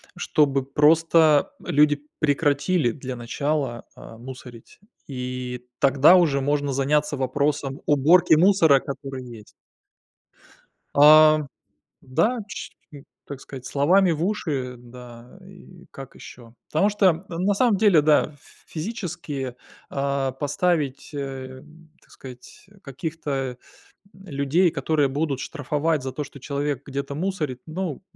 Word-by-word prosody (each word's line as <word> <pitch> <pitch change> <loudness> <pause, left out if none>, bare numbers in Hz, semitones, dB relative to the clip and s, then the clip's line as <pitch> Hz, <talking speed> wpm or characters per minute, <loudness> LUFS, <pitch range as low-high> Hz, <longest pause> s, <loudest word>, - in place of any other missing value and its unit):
чтобы 140 -3 +1
просто 155 +2 +3
люди 145 0 +2 0.2
прекратили 145 0 +1
для 130 0 -7
начала, 130 +1 -3
а, 115 - -12
мусорить. 125 -2 -12 0.3
И 125 -2 -6
тогда 140 +5 +5
уже 150 -6 +2
можно 145 0 0
заняться 145 +2 0
вопросом 140 +1 -2
уборки 155 +4 +5
мусора, 165 -4 +5
который 135 -1 -7
есть. 115 -3 -12 1.4
А, 155 +1 +7 0.6
да, 215 - 0
чь - - -7 0.2
ну, 140 - -11 0.2
так 140 -2 -8
сказать, 130 -2 -10
словами 175 +6 +3
в 160 +1 -2
уши, 145 -11 -3
да 120 +4 -14
и 185 -2 -16
как 135 -1 -11
ещё. 115 -2 -13
Потому 175 +7 +2
что 190 -4 +2
на 185 +4 0
самом 230 0 +2
деле, 195 -6 +4
да, 150 0 +3
ф 145 - -22 0.3
физически, 160 - -5 0.3
а, 140 -1 -1
поставить, 145 +1 -1
э, 135 -2 -7 0.4
так - - -28
сказать, 125 +4 -13 0.2
каких-то, 135 -3 -4 0.6
м, 190 +1 -17
людей, 160 +2 +1
которые 150 0 0
будут 140 0 -2
штрафовать 150 +1 -2
за 130 - -4
то, 150 - -4
что 140 - -13
человек 140 0 -3
где-то 140 0 -5
мусорит, 155 -7 -3
ну, 165 -1 -5
145 Hz, 120 wpm, -23 LUFS, 135-160 Hz, 1.4 s, А